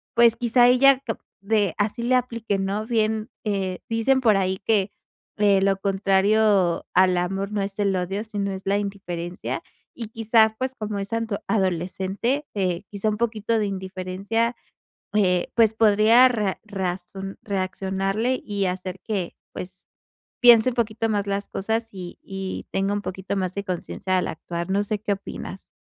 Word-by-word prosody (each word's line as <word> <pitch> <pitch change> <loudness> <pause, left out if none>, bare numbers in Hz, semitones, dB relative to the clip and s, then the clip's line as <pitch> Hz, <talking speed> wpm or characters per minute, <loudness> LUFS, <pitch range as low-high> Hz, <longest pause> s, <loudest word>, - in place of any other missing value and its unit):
pues, 235 -1 +6
quizá 240 0 +4
ella 260 +2 +6
cap 225 - -3 0.2
de 205 -2 +1
así 215 +3 -1
le 250 +2 +3
aplique 230 -5 -1
¿no? 200 +3 -2
Bien, 220 -1 0
eh, 195 -3 -2
dicen 230 +4 +2
por 220 -5 +4
ahí 190 0 0
que, 205 -3 +2 0.5
eh: 200 -2 +4
"Lo 195 0 +2
contrario 195 -1 +2
al 185 -1 +5
amor 195 +3 -2
no 210 -1 -1
es 195 0 -5
el 200 -2 +2
odio, 190 +3 -2
sino 205 -3 -3
es 190 0 -6
la 200 +1 +2
indiferencia". 180 -3 -4 0.3
Y 230 - -5
quizá, 225 0 +3
pues, 260 0 -1
como 210 -3 -4
es 195 +2 -5
anto 230 -3 -1
adolescente, 190 - -1 0.5
quizá 205 +1 0
un 210 - -2
poquito 225 -1 0
de 210 - +1
indiferencia, 195 +4 -2 0.6
eh, 180 -4 +2
pues, 225 -2 +5
podría 220 +3 +6
ra 210 -6 -1
razon 195 -1 -4
reaccionarle 195 +4 -1
y 200 -2 -1
hacer 185 0 -3
que, 195 -6 -3 0.2
pues, 180 0 -9 0.5
piense 240 0 +7
un 240 - -7
poquito 225 -1 0
más 205 -1 0
las 200 0 -2
cosas, 225 +3 -1
y 180 -3 -8
y 195 -1 -5
tenga 195 +1 0
un 205 - -2
poquito 190 +1 -4
más 185 -2 -1
de 200 - -3
conciencia 185 0 -2
al - - -1
actuar. 170 +2 -5
No 200 +1 +2
sé, 210 0 -2
¿qué 205 -1 -1
opinas? 195 -1 -7
200 Hz, 165 wpm, -24 LUFS, 190-225 Hz, 0.6 s, piense